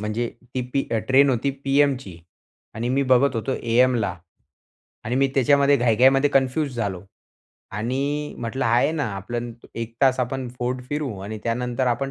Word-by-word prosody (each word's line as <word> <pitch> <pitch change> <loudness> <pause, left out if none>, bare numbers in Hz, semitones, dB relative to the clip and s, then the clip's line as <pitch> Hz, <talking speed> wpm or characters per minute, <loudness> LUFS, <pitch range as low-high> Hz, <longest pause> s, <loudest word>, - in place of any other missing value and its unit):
म्हणजे 110 +3 -2 0.3
ती 130 - 0
पी 135 - +1
अ, 115 - +2
ट्रेन 140 +2 +5
होती 130 +3 0
पीएमची. 135 - +1 0.6
आणि 115 +2 -3
मी 135 +2 +1
बघत 130 0 +3
होतो 130 +4 -2
एएमला. 115 -5 +2 0.9
आणि 120 - -2
मी 135 - +4
त्याच्यामध्ये 140 +1 +4
घाई-घाईमध्ये 130 +4 +4
कन्फ्यूज 135 +1 +1
झालो. 100 -6 -3 0.7
आणि 140 +7 -2
म्हटलं 120 +3 -3
आहे 120 +5 +3
ना 155 -2 -1
आपलं 120 +4 -4 0.2
1 115 0 -5
तास 130 -1 +4
आपण 130 0 -3
फोर्ट 125 +1 -2
फिरू 145 -2 -2
आणि 110 +2 -6
त्यानंतर 125 +2 -1
आपण 135 +3 0
125 Hz, 155 wpm, -23 LUFS, 115-135 Hz, 0.9 s, ट्रेन